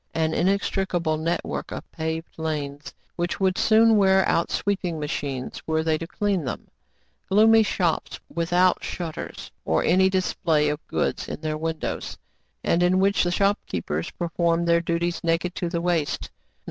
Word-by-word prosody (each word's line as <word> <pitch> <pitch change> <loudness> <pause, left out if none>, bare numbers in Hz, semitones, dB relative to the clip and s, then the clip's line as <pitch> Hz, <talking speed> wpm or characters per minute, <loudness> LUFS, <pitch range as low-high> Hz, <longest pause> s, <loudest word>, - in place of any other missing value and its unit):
An 160 -1 +1
inextricable 185 -4 0
network 165 +2 -3
of - - -7
paved 160 0 -4
lanes, 150 -2 -4 0.3
which 175 0 -2
would 190 -1 +2
soon 225 +1 +5
wear 190 -1 +4
out 170 - +1
sweeping 185 -5 -1
machines, 140 -3 -4
were 160 0 +1
they 160 -1 +2
to 165 - -5
clean 200 -2 -1
them; 125 - -5 0.6
gloomy 220 +3 +6
shops, 180 -6 -1
without 175 +2 +2
shutters 165 -3 -6
or 80 - +1
any 190 +3 +4
display 165 -5 +1
of 150 +1 -4
goods - - -1
in - - -5
their 155 -1 -2
windows, 160 +1 -4 0.5
and 170 - +2
in 180 +1 +3
which 200 +1 +3
the 175 - +1
shop 200 +3 +2
keepers 80 -2 -3
perform 170 0 0
their 170 0 +3
duties 170 +1 -1
naked 170 +1 0
to 175 - -3
the 170 -1 -2
waist; 170 -4 0
not. 60 0 -44
170 Hz, 160 wpm, -24 LUFS, 160-185 Hz, 0.6 s, gloomy